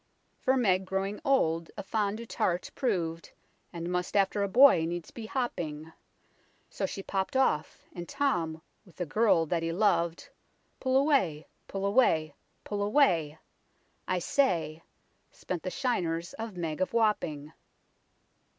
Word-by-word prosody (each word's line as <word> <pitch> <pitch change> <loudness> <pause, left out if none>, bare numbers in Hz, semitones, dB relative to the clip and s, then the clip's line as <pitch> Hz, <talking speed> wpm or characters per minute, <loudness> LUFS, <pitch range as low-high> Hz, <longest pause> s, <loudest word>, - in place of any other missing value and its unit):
" - - -43
For 260 +1 +3
Meg, 190 -6 +2
growing 195 +2 -2
old, 165 -12 +1
a - - -4
fond 210 0 -1
dotart 190 -6 -2
prov'd, 170 -9 -2 0.4
And 170 +1 -5
must 180 +3 -1
after 200 +1 +2
a 200 - +1
boy 245 -4 +6
needs 175 0 -5
be 225 -2 -8
hopping; 160 - -3 0.8
So - - -2
she 195 - -6
popp'd 195 +7 -2
off 160 - 0
and 175 -1 -7
Tom, 165 - -1 0.2
with 180 -7 -20
the 175 - -3
girl 200 -1 +3
that 165 +1 -1
he 165 0 -1
lov'd 170 -3 +1 0.5
Pull 260 0 +2
away, 270 - +2 0.2
pull 195 0 -3
away, 165 - +3 0.3
pull 205 -1 -3
away! 180 - +2 0.7
I 185 - +1
say; 170 - 0 0.5
Spent 180 -3 -5
the 185 - -3
shiners 175 -5 -2
of 220 -4 -7
Meg 165 -1 -3
of 185 - -1
Wapping." 160 -10 0
185 Hz, 140 wpm, -29 LUFS, 165-220 Hz, 0.8 s, boy